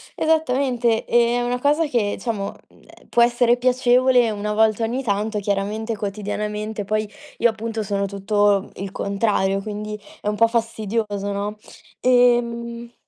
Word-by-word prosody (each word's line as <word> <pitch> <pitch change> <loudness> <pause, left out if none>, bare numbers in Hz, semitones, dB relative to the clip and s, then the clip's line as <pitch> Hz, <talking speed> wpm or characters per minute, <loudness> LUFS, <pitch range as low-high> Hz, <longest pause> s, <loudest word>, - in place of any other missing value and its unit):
esattamente. 255 -7 +1
È 240 0 +3
una 245 +1 -1
cosa 300 +3 +3
che, 225 -7 0
diciamo, 210 -5 -3 0.2
mhmm, - - -23
ehm, - - -19
può 235 - +3
essere 240 0 +3
piacevole 250 -1 +3
una 210 +1 -3
volta 220 +1 +2
ogni 250 +4 -1
tanto. 210 0 -1
Chiaramente, 205 +3 -2
quotidianamente, 210 +1 -4
poi 215 +1 -1 0.3
io, 235 - +4
appunto, 225 0 -4
sono 200 -1 -1
tutto 200 0 +1
il 195 0 -6
contrario, 200 -1 0
quindi 210 0 -5 0.2
è - - -5
un 210 - 0
po' 230 +2 +4
fastidioso, 220 -3 -2
no, 205 +1 -3 0.4
ehm 235 -1 +2
220 Hz, 140 wpm, -22 LUFS, 205-240 Hz, 0.4 s, io